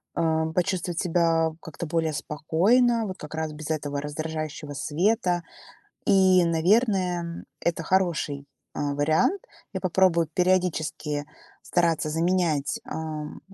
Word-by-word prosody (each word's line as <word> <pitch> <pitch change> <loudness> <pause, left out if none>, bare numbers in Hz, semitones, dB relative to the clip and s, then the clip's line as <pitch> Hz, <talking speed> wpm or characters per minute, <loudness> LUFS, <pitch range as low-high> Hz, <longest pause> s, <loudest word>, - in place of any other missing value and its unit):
а, 160 -1 +1
почувствовать 175 0 -1
себя 165 -2 +2
как-то 160 +1 -7
более 160 -1 0
спокойно, 210 - +2
вот 185 - -6
как 150 - -9
раз 160 -1 -2
без 155 +1 -6
этого 145 -2 -2
раздражающего 155 0 -5
света. 180 - +1 0.7
И, 190 -3 +5
наверное, 180 +2 +2
м, 170 0 -6 0.2
это 170 -1 -1
хороший, 165 -6 0 0.3
а, 145 -1 -1
вариант. 155 - +2 0.3
Я 190 - -3
попробую 180 -3 +3
периодически 160 -5 0 0.4
стараться 170 -3 +1
заменять, 165 -3 +1
ам, 155 -1 -5
165 Hz, 115 wpm, -26 LUFS, 155-185 Hz, 0.7 s, И